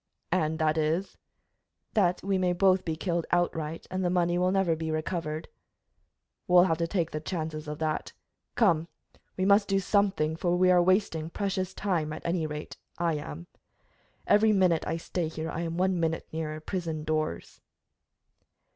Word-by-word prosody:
"And 160 -3 +1
that 155 0 +1
is?" 160 +5 0 0.8
"That 180 -4 +2
we 195 0 +1
may 180 -1 +2
both 185 +1 +3
be 160 -2 -2
killed 170 0 -2
outright, 165 -2 -1
and 185 0 -1
the 175 - +2
money 175 -1 +2
will 180 0 +2
never 190 -4 +2
be 160 0 -4
recovered." 155 0 -3 1.0
"We'll 180 0 +7
have 165 -3 +1
to 165 - 0
take 170 -2 -1
the 155 - -3
chances 155 -2 -4
of 150 0 -4
that. 155 -1 -2 0.4
Come, 170 -8 +3 0.5
we 185 - +1
must 200 +1 +5
do 195 -1 +2
something, 195 -6 +1
for 175 +1 0
we 185 0 +5
are 180 -1 +6
wasting 175 -4 +1
precious 190 0 -2
time 170 -7 -1
at - - -8
any 170 -2 0
rate, 150 0 -7 0.2
I 170 -1 +1
am. 85 - -7 0.8
Every 215 +1 +5
minute 185 -5 +3
I 165 - -1
stay 170 0 -3
here 160 0 -5
I 165 - -3
am 165 0 -3
one 185 0 +1
minute 165 -1 -1
nearer 155 -1 -3
prison 160 -2 -4
doors." 155 - -3
170 Hz, 170 wpm, -28 LUFS, 155-185 Hz, 1.0 s, We'll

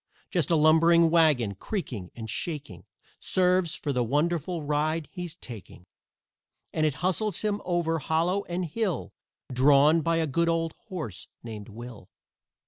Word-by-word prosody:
Just 175 -7 0
a 170 - +4
lumbering 165 +2 +5
wagon, 150 -11 +3
creaking 110 - -5
and 115 -2 -7
shaking 125 - -5 0.3
Serves 180 -2 +2
for 145 - -3
the 125 -1 +1
wonderful 160 +6 0
ride 150 +2 0
he's 175 -3 -6
taking. 110 - -11 0.9
And 155 -1 +2
it 145 - -1
hustles 190 +1 0
him 210 -1 -1
over 170 -2 0
hollow 170 +6 0
and 180 +1 -2
hill, 180 - -2 0.4
Drawn 145 +5 +5
by 165 +2 +1
a 165 -1 +1
good 170 +4 +1
old 165 -1 0
horse 150 - -6 0.2
named 110 -2 -8
WILL. 115 -2 -10
160 Hz, 140 wpm, -27 LUFS, 130-175 Hz, 0.9 s, lumbering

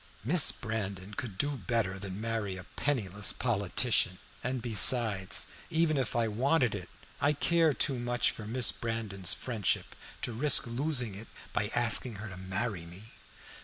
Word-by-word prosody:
"Miss 155 +7 +5
Brandon 105 -4 -5
could 115 -8 -6
do 145 +7 0
better 110 -7 -2
than 95 0 -7
marry 110 -4 -3
a 90 - -9
penniless 105 -8 -1
politician, 110 -3 0 0.3
and 125 +1 -2
besides, 110 -3 +5 0.2
even 160 -2 +1
if 130 -6 -2
I 115 -1 +1
wanted 125 +3 +1
it, 90 -4 -6 0.3
I 145 +2 +3
care 165 +2 +2
too 135 -4 -1
much 120 0 0
for 105 - -9
Miss 115 -5 +3
Brandon's 105 -4 0
friendship 115 -7 -2 0.3
to 120 - -2
risk 135 +5 +3
losing 125 -2 0
it 105 +4 -9 0.3
by 105 - 0
asking 120 0 +4
her 105 +2 -8
to 90 - -10
marry 95 0 -4
me." 95 +6 -12
115 Hz, 155 wpm, -30 LUFS, 100-125 Hz, 0.3 s, Miss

